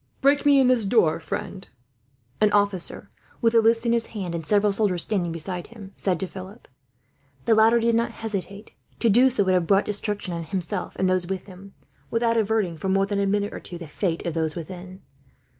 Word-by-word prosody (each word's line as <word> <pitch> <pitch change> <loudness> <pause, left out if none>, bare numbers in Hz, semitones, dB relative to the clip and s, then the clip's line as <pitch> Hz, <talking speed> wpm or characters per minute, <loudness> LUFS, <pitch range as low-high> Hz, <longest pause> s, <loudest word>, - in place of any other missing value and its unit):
"Break 285 +1 +3
me 285 -1 +6
in 265 - +4
this 250 -3 +3
door, 195 -7 +2
friend," 175 +4 -6 0.7
an 210 -1 +4
officer, 200 -3 0 0.3
with 230 -1 +2
a 230 - +6
list 230 +1 +2
in 235 - +2
his 235 -1 0
hand 180 -4 -4
and 165 -1 -4
several 205 +4 +3
soldiers 195 -5 +3
standing 180 -5 -1
beside 175 +2 -5
him, 210 -4 -12
said 185 -4 -1
to - - 0
Philip. 190 +5 -11 0.8
The 230 - +4
latter 220 +2 +5
did 230 0 +1
not 230 +1 +1
hesitate. 205 -2 -6 0.3
To 230 - +3
do 250 +5 +5
so 240 -5 +1
would 190 -1 +1
have 180 -2 +1
brought 195 0 +3
destruction 205 -3 -2
on 170 -1 -4
himself 185 -1 -4
and 190 - 0
those 185 -1 0
with 190 -1 -4
him; 195 0 -14 0.3
without 230 0 +1
averting, 215 -6 0
for 190 +5 -3
more 195 +1 +2
than 200 0 -2
a 200 - +1
minute 205 +1 -1
or - - -6
two, 175 - -8
the 170 -2 -9
fate 165 +2 -3
of 170 - -2
those 160 -2 0
within. 185 +3 -8
200 Hz, 210 wpm, -24 LUFS, 180-225 Hz, 0.8 s, me